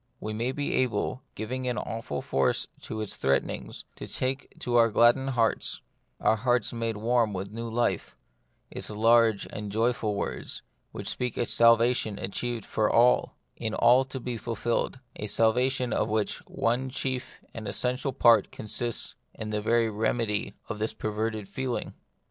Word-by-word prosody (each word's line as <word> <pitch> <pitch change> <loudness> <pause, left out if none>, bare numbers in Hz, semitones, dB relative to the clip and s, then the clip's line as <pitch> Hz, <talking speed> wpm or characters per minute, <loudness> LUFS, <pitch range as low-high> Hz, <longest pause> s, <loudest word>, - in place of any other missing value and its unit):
We 110 - -4
may 115 +4 -1
be 145 +1 -2
able, 125 0 0
giving 125 +4 -3
an 125 -1 -1
awful 110 -11 -4
force 65 0 +1 0.2
to - - -5
all 110 - -3
its 105 - -4
threatenings, 70 0 -1
to - - -7
take 130 +2 -2
to 120 -1 -1
our 115 -1 +6
gladdened 120 +5 +4
hearts 115 -1 +1 0.2
— - - -45
our 110 - +3
hearts 120 0 +1
made 115 -2 -2
warm 115 0 +2
vvith 95 +1 -4
a - - -17
new 115 +1 -5
life 120 +2 0 0.3
— - - -43
its - - -5
large 115 0 +4
and 105 -1 -5
joyful 110 -1 +1
words, - - -4 0.3
which - - -7
speak 125 -2 -2
of - - +2
a - - -2
salvation 115 -2 +4
achieved 115 +4 -3
for 105 -1 +1
all, 125 +1 +4 0.2
in 110 -1 -3
all 125 +3 +6
to 130 0 -6
be 125 -1 -4
fulfilled; 115 +3 -2 0.2
a 105 - -4
salvation 125 +3 +2
of 110 - +1
which 110 -1 0
one, 125 +3 0
chief 130 -1 -3 0.2
and 110 -2 -7
most - - -3
essential 125 +3 0
part 120 -3 +5
consists 115 +2 -3 0.2
in 110 -1 -5
the 105 0 -1
very 115 +1 +3
remedy 110 0 -1
of 105 - -5
this 110 +1 -2
perverted 110 -1 -2
feeling. 125 +4 -3
115 Hz, 175 wpm, -28 LUFS, 110-125 Hz, 0.3 s, our